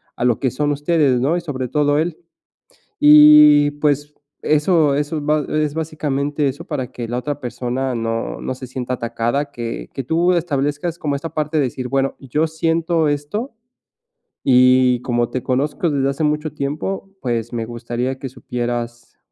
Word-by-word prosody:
a 120 Hz, -, -2 dB
lo 120 Hz, -3 st, +3 dB
que 130 Hz, -, 0 dB
son 145 Hz, +2 st, -1 dB
ustedes, 145 Hz, -3 st, +2 dB
¿no? 150 Hz, +6 st, +1 dB
Y -, -, -3 dB
sobre 135 Hz, -6 st, -4 dB
todo 145 Hz, +1 st, +2 dB
él. 165 Hz, 0 st, -2 dB, 0.8 s
Y, 150 Hz, 0 st, +8 dB
pues, 145 Hz, 0 st, 0 dB, 0.3 s
eso 150 Hz, -1 st, +3 dB
eso 150 Hz, +2 st, -1 dB
ba 150 Hz, 0 st, +1 dB
es 150 Hz, -1 st, 0 dB
básicamente 150 Hz, -2 st, -2 dB
eso 140 Hz, +5 st, -4 dB
para 135 Hz, -8 st, -4 dB
que 120 Hz, -2 st, -5 dB
la 120 Hz, -, -2 dB
otra 145 Hz, +3 st, -4 dB
persona 125 Hz, +1 st, -3 dB
no 115 Hz, 0 st, -3 dB
no 130 Hz, -, -3 dB
se 130 Hz, 0 st, -9 dB
sienta 130 Hz, 0 st, -4 dB
atacada, 120 Hz, +5 st, -2 dB
que 115 Hz, -, -6 dB
que 135 Hz, -, -4 dB
tú 165 Hz, +7 st, +2 dB
establezcas 150 Hz, 0 st, -1 dB
como 145 Hz, -2 st, -1 dB
esta 165 Hz, +4 st, -6 dB
parte 155 Hz, 0 st, -1 dB
de 150 Hz, -, +3 dB
decir: 125 Hz, 0 st, -5 dB
"Bueno, 135 Hz, +1 st, 0 dB
yo 150 Hz, +4 st, -1 dB
siento 165 Hz, 0 st, 0 dB
esto, 150 Hz, -, -3 dB, 0.9 s
y 125 Hz, -1 st, +5 dB
como 120 Hz, -1 st, 0 dB
te 130 Hz, -, -3 dB
conozco 135 Hz, +7 st, -1 dB
desde 140 Hz, -2 st, +1 dB
hace 140 Hz, +3 st, -4 dB
mucho 150 Hz, 0 st, -1 dB
tiempo, 150 Hz, +7 st, -4 dB
pues, 120 Hz, -2 st, -2 dB
me 115 Hz, -1 st, -2 dB
gustaría 120 Hz, +2 st, -4 dB
que 135 Hz, -, -5 dB
supieras 120 Hz, -1 st, -5 dB
140 Hz, 170 wpm, -19 LUFS, 125-150 Hz, 0.9 s, Y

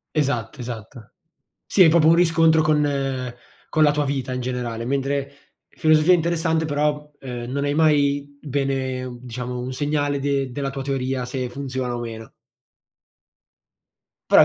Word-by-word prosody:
Esatto, 130 Hz, -7 st, -1 dB
esatto. 115 Hz, -1 st, -8 dB, 0.5 s
Sì, 190 Hz, -, +4 dB
è 165 Hz, -, +8 dB
proprio 160 Hz, -1 st, +5 dB
un 165 Hz, -, +7 dB
riscontro 165 Hz, -2 st, +4 dB
con 140 Hz, -5 st, 0 dB, 0.4 s
con 155 Hz, -, +2 dB
la 150 Hz, -, +6 dB
tua 145 Hz, 0 st, 0 dB
vita 135 Hz, -2 st, -2 dB
in 125 Hz, -, -2 dB
generale, 120 Hz, -2 st, -3 dB
mentre 140 Hz, +1 st, -1 dB, 0.4 s
filosofia 155 Hz, +2 st, +4 dB
interessante 165 Hz, -1 st, +1 dB
però, 150 Hz, 0 st, -1 dB
ehm, 125 Hz, -2 st, -6 dB
non 140 Hz, +1 st, -1 dB
hai 145 Hz, 0 st, 0 dB
mai 145 Hz, -2 st, +2 dB
bene 130 Hz, -3 st, -2 dB
diciamo 125 Hz, 0 st, -5 dB
un 125 Hz, +1 st, -4 dB
segnale 145 Hz, 0 st, 0 dB
de 140 Hz, -1 st, 0 dB
della 135 Hz, +2 st, -3 dB
tua 135 Hz, 0 st, -6 dB
teoria 130 Hz, -1 st, -2 dB
se 130 Hz, -1 st, -3 dB
funziona 130 Hz, -2 st, -3 dB
o 120 Hz, -, -3 dB
meno. 115 Hz, -1 st, -7 dB, 2.0 s
Però -, -, +9 dB
è -, -, +7 dB
140 Hz, 150 wpm, -23 LUFS, 125-150 Hz, 2.0 s, Però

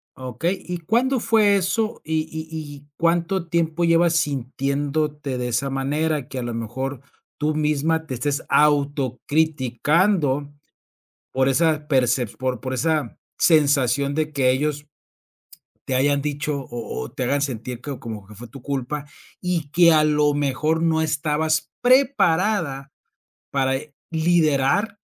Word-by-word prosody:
Okey, 130 Hz, +9 st, -3 dB
¿y 180 Hz, 0 st, -3 dB
cuándo 240 Hz, +9 st, +1 dB
fue 215 Hz, -3 st, +3 dB
eso? 215 Hz, +4 st, 0 dB
Y 160 Hz, 0 st, 0 dB
y 160 Hz, 0 st, -6 dB
y, 145 Hz, -2 st, -8 dB
¿cuánto 170 Hz, +2 st, +1 dB
tiempo 170 Hz, 0 st, 0 dB
llevas 170 Hz, 0 st, +4 dB
sintiéndote 145 Hz, 0 st, -1 dB
de 125 Hz, -, -2 dB
esa 125 Hz, +3 st, -1 dB
manera? 145 Hz, +1 st, -1 dB
Que, 135 Hz, -, -7 dB
a -, -, -3 dB
lo 120 Hz, 0 st, -4 dB
mejor, 125 Hz, +4 st, -4 dB, 0.4 s
tú 150 Hz, +1 st, 0 dB
misma 155 Hz, +1 st, 0 dB
te 155 Hz, -, -6 dB
estés 140 Hz, +3 st, -2 dB
autocriticando 145 Hz, -, +1 dB, 0.8 s
por 130 Hz, 0 st, +2 dB
esa 155 Hz, +1 st, +1 dB
percep 125 Hz, -4 st, +1 dB
por 130 Hz, -2 st, -2 dB
por 130 Hz, -, -4 dB
esa 155 Hz, +3 st, -1 dB, 0.2 s
sensación 140 Hz, -3 st, +3 dB
de 155 Hz, 0 st, -1 dB
que 135 Hz, -3 st, +2 dB
ellos 145 Hz, +2 st, -1 dB, 1.0 s
te 130 Hz, -, 0 dB
hayan 140 Hz, +2 st, +2 dB
dicho 145 Hz, 0 st, -2 dB
o 120 Hz, -, -5 dB
o 60 Hz, -, -9 dB
te -, -, -4 dB
hagan 140 Hz, +3 st, +1 dB
sentir 125 Hz, -3 st, -4 dB
que 140 Hz, -1 st, -6 dB
como 110 Hz, -3 st, -7 dB
que 105 Hz, +2 st, -14 dB
fue 120 Hz, +4 st, -9 dB
tu 135 Hz, +4 st, -12 dB
culpa, 140 Hz, +2 st, -3 dB, 0.4 s
y 175 Hz, -5 st, -2 dB
que, 170 Hz, 0 st, +6 dB
a 155 Hz, -1 st, +5 dB
lo 150 Hz, -1 st, +3 dB
mejor, 145 Hz, +3 st, 0 dB
no 160 Hz, -1 st, +2 dB
estabas 155 Hz, 0 st, 0 dB
preparada 200 Hz, -, +2 dB, 0.6 s
para, 135 Hz, -1 st, +1 dB
eh, 145 Hz, +2 st, -7 dB, 0.2 s
liderar 165 Hz, +4 st, +2 dB
150 Hz, 140 wpm, -22 LUFS, 135-160 Hz, 1.0 s, que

